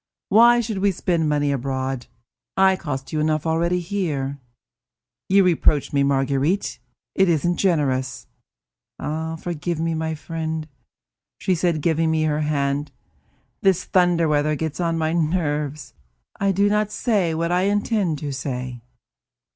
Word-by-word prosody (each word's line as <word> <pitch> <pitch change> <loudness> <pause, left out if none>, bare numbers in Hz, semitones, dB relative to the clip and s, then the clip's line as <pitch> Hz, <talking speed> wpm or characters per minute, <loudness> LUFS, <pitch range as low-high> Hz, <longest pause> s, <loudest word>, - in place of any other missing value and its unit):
"Why 240 +2 +6
should 215 -3 -3
we 200 +1 +3
spend 170 -3 0
money 145 -1 +1
abroad? 130 -1 -3 0.5
I 190 0 +5
cost 145 -7 -5
you 155 - 0
enough 155 0 0
already, 170 +2 +1
here." 155 -8 -2 0.9
"You 195 +1 +5
reproach 160 -5 +2
me, 140 - +3
Marguerite; 140 +6 0 0.3
it 190 -1 +3
isn't 170 +2 +1
generous." 135 -8 0 0.7
"Forgive 160 +1 -3
me, 165 0 0
my 160 0 -2
friend," 160 0 -4 0.7
she 185 - 0
said, 170 -3 0
giving 165 -1 +2
me 160 0 +1
her 155 -1 0
hand. 145 -1 -1 0.7
"This 190 -2 +3
thunder 175 -3 +2
weather 150 0 +1
gets 160 0 -4
on 165 -2 0
my 160 0 0
nerves; 150 -5 -1 0.5
I 195 0 +2
do 200 +2 +2
not 210 0 +1
say 200 -9 0
what 170 +1 -1
I 180 +1 +2
intend 205 -4 0
to 145 - -2
say." 125 -2 -5
160 Hz, 140 wpm, -22 LUFS, 145-180 Hz, 0.9 s, Why